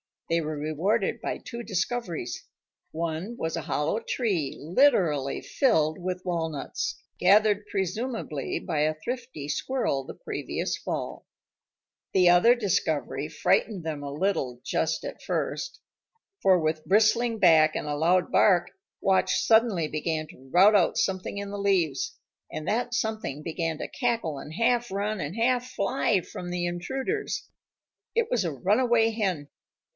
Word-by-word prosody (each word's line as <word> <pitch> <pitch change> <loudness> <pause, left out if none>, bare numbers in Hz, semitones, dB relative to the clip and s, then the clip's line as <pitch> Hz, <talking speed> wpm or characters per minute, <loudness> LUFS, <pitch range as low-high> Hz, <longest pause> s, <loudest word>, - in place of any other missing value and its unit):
They 165 0 +3
were 155 -1 -4
rewarded 170 +8 0
by - - -2
two 235 -1 -7
discoveries. 185 - -3 0.5
One 165 +7 -3
was 160 0 -2
a 165 - -4
hollow 150 +9 -1
tree 195 - -1
literally 165 - +2
filled 160 - +1
with 180 0 -4
walnuts, 160 -5 -3 0.2
gathered 210 0 +4
presumably 195 - -3
by 160 -5 -3
a 155 +1 +2
thrifty 235 - -6
squirrel 150 - -1
the - - -7
previous - - -3
fall. - - -5 0.9
The 180 -2 +5
other 175 +8 +6
discovery 160 - -1
frightened 165 +5 +1
them 155 -2 -4
a 140 - -5
little 140 -7 -1
just 160 0 -1
at - - -7
first. - - -3 0.6
For 190 -1 +5
with 155 -1 -1
bristling 225 +4 +3
back 160 -5 +5
and - - -2
a 145 - -1
loud 175 +3 +2
bark, 175 -4 +4 0.3
Watch 190 -1 +2
suddenly 220 -8 +3
began 155 0 -2
to 135 -2 -16
rout 190 +8 +6
out 180 -4 +3
something 190 +1 -1
in 200 0 -4
the 205 - -5
leaves, 180 -8 0 0.3
and 155 - -6
that 245 +2 0
something 215 - -2
began 165 -1 -2
to - - -3
cackle 230 - -1
and 150 - -9
half 240 +4 +1
run 205 +2 -2
and 150 +3 -4
half 250 +2 +1
fly 200 -2 +1
from 175 +1 -8
the 175 0 -2
intruders. 265 - -3 0.7
It 465 -1 +1
was 235 -7 +1
a 165 - -1
runaway 225 - +3
hen. 185 -10 -2
180 Hz, 145 wpm, -27 LUFS, 155-220 Hz, 0.9 s, other